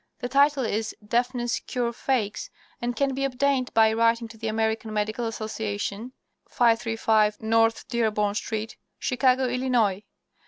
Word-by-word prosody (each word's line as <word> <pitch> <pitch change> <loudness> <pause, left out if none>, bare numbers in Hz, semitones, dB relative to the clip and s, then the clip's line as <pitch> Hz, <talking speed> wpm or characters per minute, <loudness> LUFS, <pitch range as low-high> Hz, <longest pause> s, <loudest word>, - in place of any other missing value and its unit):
The 245 - -5
title 280 0 +3
is 220 0 -2
"Deafness 240 +1 0
Cure 240 -2 -2
Fakes," 235 -5 -2 0.3
and 240 0 -2
can 275 +1 +1
be 270 +1 -2
obtained 270 -1 0
by 220 -1 +5
writing 230 +1 +2
to 225 - -13
the 225 - -3
American 220 0 -1
Medical 215 +2 -1
Association, 215 +1 -4 0.4
535 225 -2 +2
North 225 +1 +2
Dearborn 215 -4 0
Street, 220 +1 -4 0.2
Chicago, 255 0 +2
Illinois. 245 -6 +1
230 Hz, 130 wpm, -25 LUFS, 220-250 Hz, 0.4 s, by